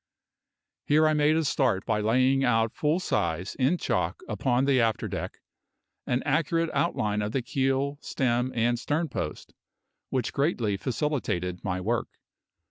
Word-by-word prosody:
Here 155 +2 +5
I 155 - +3
made 150 +1 +3
a 160 -1 +1
start 130 -8 +1
by 110 -2 +1
laying 130 +5 +3
out, 115 -3 +2
full 155 +4 +1
size, 95 - -1
in 135 +7 +3
chalk, 365 - -1
upon 130 -1 +1
the 135 -3 +3
after 115 -1 0
deck, - - -5 0.7
an 125 +1 0
accurate 165 +1 +1
outline 105 -11 0
of 105 +2 -3
the 135 - 0
keel, 135 +2 0
stem, 125 -1 0
and 120 +1 +1
sternpost, 150 +2 -3 0.6
which 125 -4 -1
greatly 130 - 0
facilitated 95 - -2
my 95 -2 -2
work. 115 +5 -1
130 Hz, 140 wpm, -27 LUFS, 110-145 Hz, 0.7 s, Here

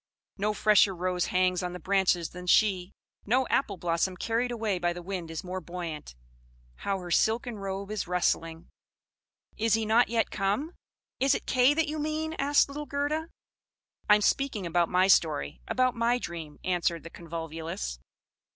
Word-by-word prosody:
No 210 +1 -1
fresher 205 -2 +4
rose 180 0 -1
hangs 185 -1 +1
on 180 -1 -3
the 180 - -6
branches 185 -2 +1
than 180 0 -9
she; 190 -2 +3 0.3
no 255 +5 +2
appleblossom 180 -5 0
carried 230 +5 0
away 220 -6 -1
by 175 0 0
the 175 - -7
wind 180 -3 -5
is 165 +3 -5
more 185 +1 -5
buoyant! 165 - -6 0.6
How 200 -1 -2
her 180 -2 -8
silken 225 +4 +1
robe 195 +1 -4
is 215 -4 -3
rustling! 165 -2 -1 0.9
"'Is 220 -1 +3
he 225 -1 -1
not 225 +3 +4
yet 230 -1 0
come?'" 210 - -1 0.5
"Is 275 +1 +3
it - - -5
Kay 255 +3 +4
that 325 0 +1
you 305 +1 -3
mean?" 310 +1 -2
asked 285 +1 +4
little 295 +1 -6
Gerda. 300 +3 -2 0.8
"I 210 - +9
am 210 - +1
speaking 235 -4 0
about 170 0 +1
my 185 +1 +3
story 70 - +2
about 255 -1 +2
my 235 +1 +1
dream," 165 -9 -7
answered 175 -3 0
the 165 - -10
Convolvulus. 160 - -5
195 Hz, 165 wpm, -28 LUFS, 175-235 Hz, 0.9 s, I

